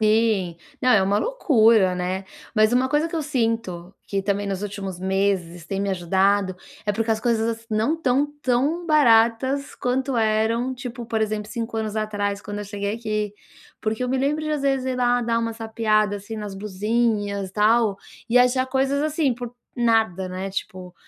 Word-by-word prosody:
Sim. 215 -5 +2 0.2
Não, 255 - +3
é 220 -6 +6
uma 200 +2 +2
loucura, 225 - +3
né. 185 +2 -2 0.3
Mas 215 0 +4
uma 255 +1 +3
coisa 295 +3 +1
que 335 - -4
eu 320 - -1
sinto, 225 - -2
que 195 -1 -2
também 200 +1 -1
nos 195 0 -3
últimos 195 -3 -5
meses 190 -3 -1
tem 195 +1 -2
me 200 - -1
ajudado, 190 +1 +1 0.3
é 205 - +1
porque 225 +2 -1
as 220 0 +1
coisas, 230 -1 +1
ass 225 - -20
não 220 +8 +1
estão 280 -3 +1 0.2
tão 280 +8 +1
baratas 260 -2 +3
quanto 255 +1 -1
eram, 225 +3 +1
tipo, 245 -2 -7
por 220 -1 -1
exemplo, 215 -1 -2
5 225 0 -4
anos 220 -1 -2
atrás 205 -2 -1
quando 205 0 -6
eu 210 - -4
cheguei 200 0 -3
aqui. 215 -2 -2 0.5
Porque 220 +3 -2
eu - - -2
me 260 +1 0
lembro 295 +3 0
de 310 - -2
às 300 -2 -1
vezes 270 -2 +1
ir 260 -1 -1
lá 245 0 +2
dar 230 0 +1
uma 230 0 -1
sapeada, 220 -2 0
assim, 215 +3 -7
nas 210 -2 -5
blusinhas, 205 0 -1
tal, 215 +1 +3 0.3
e 245 - +5
achar 250 +1 +3
coisas, 270 +2 +1
assim, 305 -4 +1
por 245 0 -7 0.2
nada, 220 -6 +2
né, 185 +1 -4
tipo, 185 -2 -6
220 Hz, 185 wpm, -23 LUFS, 200-245 Hz, 0.5 s, é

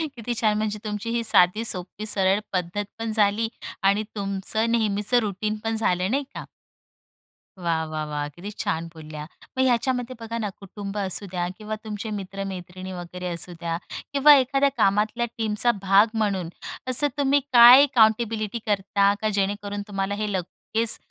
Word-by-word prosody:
किती 240 0 -4
छान, 215 -2 +2
म्हणजे 215 0 -2
तुमची 210 +2 -4
ही 235 0 0
साधी, 215 -1 +4
सोपी, 190 +1 -2
सरळ 195 -1 +2
पद्धतपण 205 +5 -3
झाली 215 +1 +2 0.4
आणि 200 +2 +3
तुमचं 200 +3 -1
नेहमीचं 215 +1 +2
रूटीनपण 215 +1 -2
झालं 185 -3 0
नाही 280 +3 +1
का. - - -6 1.1
वाह, 165 -2 0
वाह, 155 -1 -4
वाह! 150 -1 -3
किती 175 +8 -9
छान 165 +1 -1
बोलल्या. 155 -2 -8 0.3
मग 260 - +3
ह्याच्यामध्ये 255 0 0
बघा 230 0 -5
ना 215 -3 -2
कुटुंब 200 +1 -7
असू 200 0 -1
द्या 175 -1 -1
किंवा 215 0 -5
तुमचे 215 0 -5
मित्र-मैत्रिणी 190 -2 -6
वगैरे 180 0 -6
असू 170 +1 -5
द्या 165 -1 -2 0.4
किंवा 290 +1 +8
एखाद्या 275 +1 +3
कामातल्या 215 +3 +2
टीमचा 220 +1 +2
भाग 195 +2 +5
म्हणून 200 -6 -1 0.4
असं 255 +3 +4
तुम्ही 285 0 +3
काय 245 +3 +10
काउंटेबिलिटी 220 -1 +2
करता, 200 -1 +2
का 215 - +1
जेणेकरून 205 +1 -2
तुम्हाला 195 0 -2
हे 210 0 -2
लगेच 220 +5 -1
210 Hz, 150 wpm, -24 LUFS, 190-225 Hz, 1.1 s, काय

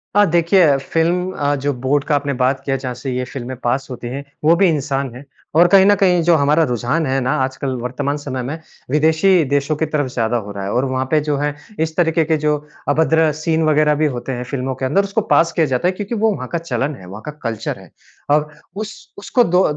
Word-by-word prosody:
हाँ, 205 0 +6
देखिए 170 -3 +4
फ़िल्म 170 +6 0
अ, 145 0 0
जो 140 +1 -1
बोर्ड 140 +2 +2
का 150 - +2
आपने 140 0 -1
बात 135 +1 +1
किया 135 - 0
जहाँ 130 -2 -4
से 130 +1 -5
ये 125 0 -2
फ़िल्में 130 0 -6
पास 130 +3 0
होती 120 -1 -6
हैं, 135 +3 -5 0.2
वो 165 +2 +5
भी 190 +1 +4
इंसान 140 -4 -1
हैं। 130 +3 -11 0.3
और 175 +2 +6
कहीं 195 +1 +6
न 205 0 +5
कहीं 180 -3 +3
जो 170 0 +4
हमारा 150 +2 +3
रुझान 130 +7 0
है 135 +1 0
ना 125 - 0
आजकल 130 0 -2
वर्तमान 140 +4 -2
समय 130 -3 -5
में 145 +6 -4 0.3
विदेशी 160 +4 +3
देशों 145 +2 +1
की 160 - 0
तरफ़ 150 -3 -1
ज़्यादा 120 0 0
हो 105 -2 -6
रहा 100 -1 -6
है 100 - -3
और 125 +3 +1
वहाँ 130 0 -1
पे 155 - +4
जो 145 -2 +1
है 145 +1 -1 0.3
इस 160 0 -1
तरीके 165 -2 +2
के 160 0 +1
जो 150 0 +1 0.3
अभद्र 160 +1 +3
सीन 160 0 +1
वग़ैरह 150 -1 +3
भी 155 - +4
होते 120 +2 -5
हैं 125 0 -3
फ़िल्मों 130 0 -3
के 130 +1 -3
अंदर 195 +10 +2
उसको 200 +2 -1
पास 165 0 +4
किया 165 -1 +2
जाता 130 +4 0
है - - +3
क्योंकि 205 +4 -5
वो 220 0 +2
वहाँ 130 -2 -6
का 170 - 0
चलन 140 -3 -2
है, 95 - -13
वहाँ 100 +4 -9
का 150 - -4
कल्चर 115 -2 -3
है। - - -15 0.4
और 150 +1 +2 0.3
उस 215 +1 -8
उसको 240 +4 +2
दो 180 -1 +3
145 Hz, 240 wpm, -18 LUFS, 130-165 Hz, 0.4 s, हाँ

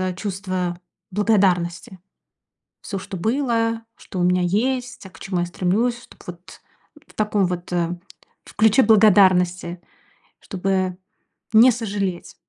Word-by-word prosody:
чувство 185 -3 -4 0.3
благодарности. 190 -2 0 0.8
Всё, 195 - -5
что 190 0 -7
было, 230 +1 0
что 185 - -8
у - - +1
меня 180 0 +2
есть, 245 +6 -1
а - - -9
к 165 -3 -18
чему 185 -2 -3
я - - 0
стремлюсь, 210 +7 -1
чтоб - - -18
вот 175 0 -11 0.5
в - - -20
таком 210 -2 0
вот, 180 0 -5
э, 175 0 -1 0.5
в - - -16
ключе 220 +4 +4
благодарности, 185 -5 +4 0.6
чтобы 190 -1 -2 0.6
не 235 +4 +7
сожалеть. 200 -6 -4
195 Hz, 125 wpm, -21 LUFS, 180-220 Hz, 0.8 s, не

